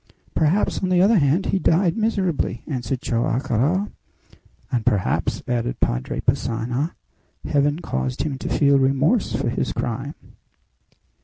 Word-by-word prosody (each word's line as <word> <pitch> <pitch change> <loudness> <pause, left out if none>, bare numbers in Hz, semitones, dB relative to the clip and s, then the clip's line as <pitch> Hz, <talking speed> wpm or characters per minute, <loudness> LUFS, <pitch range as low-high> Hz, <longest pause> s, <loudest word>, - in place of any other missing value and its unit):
"Perhaps, 165 +6 +1
on 185 - 0
the 180 -1 +3
other 200 +3 +5
hand, 150 +6 +2
he 195 - +1
died 170 0 +2
miserably!" 190 - -1
answered 130 -2 -3
Joam 120 0 0
Garral. 140 - 0 0.8
"And, 120 -4 0
perhaps," 105 -6 0
added 120 0 -1
Padre - - -1
Passanha, 125 +7 -1 0.5
"Heaven 145 +2 +1
caused 65 -1 -2
him 140 -3 -3
to - - -4
feel 140 -1 +4
remorse 135 - +2
for - - -1
his - - -1
crime." - - -3
140 Hz, 135 wpm, -22 LUFS, 120-175 Hz, 0.8 s, other